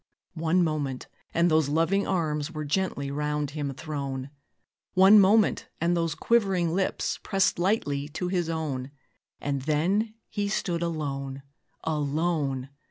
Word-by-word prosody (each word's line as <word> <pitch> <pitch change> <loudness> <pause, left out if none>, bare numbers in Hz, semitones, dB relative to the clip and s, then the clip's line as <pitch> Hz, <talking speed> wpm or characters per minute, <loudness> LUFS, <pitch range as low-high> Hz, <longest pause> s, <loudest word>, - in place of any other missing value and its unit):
One 165 +3 +3
moment, 145 -5 -2 0.3
and 170 0 +2
those 155 -2 +3
loving 165 +6 +2
arms 155 -5 0
Were 155 -2 -4
gently 145 -3 -1
round 150 0 -1
him 145 -2 -3
thrown; 140 -3 -4 0.6
One 190 +3 +8
moment, 205 +2 +4
and 170 +1 +2
those 165 -2 0
quivering 190 -8 +2
lips 190 +1 -1
Pressed 195 -2 +1
lightly 145 -7 0
to 170 +4 -3
his 175 -2 0
own: 145 -5 -3 0.5
And 140 -1 -2
then 185 - +1
he 205 -1 -2
stood 175 -4 -1
alone! 140 -5 -3 0.4
_alone! 150 -3 -1
160 Hz, 130 wpm, -27 LUFS, 145-180 Hz, 0.6 s, One